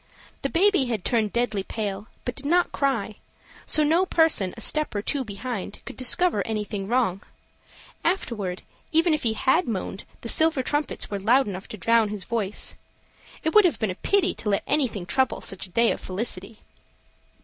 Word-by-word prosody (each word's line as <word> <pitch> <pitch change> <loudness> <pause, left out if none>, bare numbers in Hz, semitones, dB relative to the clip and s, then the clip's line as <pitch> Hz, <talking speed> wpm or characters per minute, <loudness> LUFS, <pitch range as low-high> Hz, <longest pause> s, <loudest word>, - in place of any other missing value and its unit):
The 275 - -1
baby 370 -3 +3
had 225 -6 -3
turned 220 -4 +1
deadly 235 -4 0
pale, 205 0 -4 0.2
but 245 - -2
did 280 +1 -6
not 350 +3 +3
cry, 235 -7 -1 0.5
so 305 - +4
no 325 +5 +3
person 320 - +3
a - - -7
step 305 -3 -1
or 205 - -1
two 280 +2 -1
behind 210 -1 -5
could - - -8
discover 260 - +3
anything 210 -1 -3
wrong; 225 -5 +1 0.8
afterward, 215 - -1 0.3
even 330 +1 +3
if 305 - 0
he 225 -2 +2
had 265 +10 +2
moaned, 195 -3 -4 0.2
the - - -6
silver 315 +1 +3
trumpets 290 -3 -2
were 200 - -2
loud 240 +6 +3
enough 190 -1 -6
to 215 - -8
drown 230 +1 +3
his 205 -2 -3
voice. 215 -4 -2 0.7
It 320 - 0
would 425 - +8
have 355 - +2
been 220 -4 -1
a - - -3
pity 400 - +1
to 210 - -4
let 200 - +1
anything 235 -11 0
trouble 260 +7 +1
such 195 0 -3
a - - -20
day 230 +5 +3
of - - -4
felicity. 195 +1 -3
230 Hz, 180 wpm, -25 LUFS, 200-290 Hz, 0.8 s, would